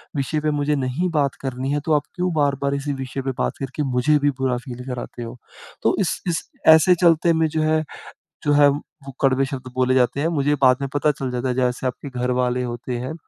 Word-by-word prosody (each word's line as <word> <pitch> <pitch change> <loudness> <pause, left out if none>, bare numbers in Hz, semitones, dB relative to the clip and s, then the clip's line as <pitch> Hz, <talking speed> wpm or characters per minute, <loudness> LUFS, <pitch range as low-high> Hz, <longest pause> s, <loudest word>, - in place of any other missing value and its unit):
विषय 145 +2 -1
पे 155 - 0
मुझे 145 0 0
नहीं 140 +7 -1
बात 140 -3 +1
करनी 130 0 -3
है 145 - +1
तो 160 - +2
आप 150 - +2
क्यों 180 0 -1
बार-बार 140 -2 +1
इसी 140 +1 -3
विषय 135 0 -5
पे 135 0 -2
बात - - -1
करके 135 +2 -3
मुझे 125 +5 +3
भी 145 0 +2
बुरा 130 -2 0
फ़ील 125 -1 -8
कराते 125 -1 -6
हो। 115 +2 -8 0.5
तो - - +3
इस - - -1
इस 170 -2 -1 0.3
ऐसे 180 +3 +4
चलते 170 -1 +4
में 160 0 +2
जो 155 0 -1
है 155 0 +2 0.6
जो 145 - +3
है 145 0 +6
वो 140 -1 -6
कड़वे 135 0 +3
शब्द 130 -2 -7
बोले 130 0 +2
जाते 130 +1 +2
हैं। 155 - +1
मुझे 145 +1 +2
बाद 125 -1 +6
में 140 - -2
पता 150 +1 +2
चल 135 -2 -5
जाता 125 +1 -2
है 125 - -1
जैसे 125 0 0
आपके 135 +3 -5
घर 125 +1 0
वाले 125 0 0
होते 120 0 -4
हैं, 130 +5 -4
135 Hz, 230 wpm, -22 LUFS, 125-150 Hz, 0.6 s, है